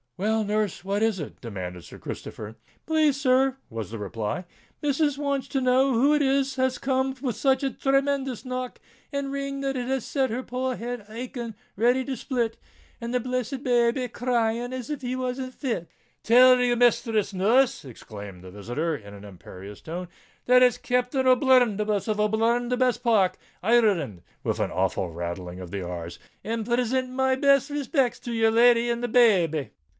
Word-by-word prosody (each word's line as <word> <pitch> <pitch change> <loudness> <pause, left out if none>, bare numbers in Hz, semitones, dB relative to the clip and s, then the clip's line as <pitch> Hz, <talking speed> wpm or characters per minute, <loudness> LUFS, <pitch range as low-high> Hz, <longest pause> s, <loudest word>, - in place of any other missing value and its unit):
"Well, 220 +3 +1
nurse—what 205 -1 -1
is 220 -4 +1
it?" 150 - -8
demanded 90 -6 -6
Sir - - -12
Christopher. 110 0 -7 0.3
"Please, 310 -3 +2
sir," 265 -1 +3
was 110 -4 -5
the 115 - -6
reply, 105 - -4 0.4
"missus 290 0 +1
wants 280 -2 -1
to 270 - -1
know 260 +1 +3
who 270 +6 +4
it 300 - +3
was 270 -1 +1
as 260 0 +1
come 265 0 0
with 255 -5 -2
such 270 0 +2
a 270 - 0
chemendous 275 -1 0
knock 255 0 -4 0.3
and 280 -1 -3
ring 275 0 -3
that 270 0 -1
it 245 -1 -3
has 265 -2 -1
set 270 -2 0
her 245 +4 -3
poor 255 +1 -2
head 240 0 -5
a 215 - -13
aching 235 -1 -6 0.2
ready 245 +5 +2
to 270 - -3
split, 235 -2 -2 0.4
and 235 0 -5
the 250 - +2
blessed 255 +2 -3
babby 240 0 +2
a 250 - -4
crying 240 0 -1
as 255 +1 -5
if 290 -2 -4
he 250 0 -3
was 255 0 -3
in 260 -1 -4
fits." 235 - -4 0.3
"Tell 250 +2 +6
your 245 -1 +2
misthress, 230 -3 +2
nurse," 235 +7 +2
exclaimed 100 -7 -10
the 95 - -10
visitor, 120 - -3
in 100 -6 -10
an 100 - -12
imperious 100 +1 -11
tone, 175 +3 -6 0.4
"that 250 0 +6
it's 250 -2 +4
Captain 250 +2 0
O'Bluntherbuss, 240 -6 +3
of 215 -1 0
Bluntherbuss 240 +4 +1
Park, 220 -7 +2 0.3
Ir 220 - +1
r 240 0 +7
reland," 110 - -6 0.2
with - - -1
an - - -1
awful 90 - -1
rattling 85 +2 -5
of 90 -2 -8
the 100 -2 -4
r's; 85 -1 -6 0.3
"and 225 0 -3
prisint 250 +2 0
my 265 +1 +1
best 275 +1 +3
rispicts 275 -3 0
to 240 - -5
your 225 -1 +3
lady 235 +1 +5
and 235 0 -1
the - - +1
babby." 185 - +3
245 Hz, 180 wpm, -25 LUFS, 200-260 Hz, 0.4 s, r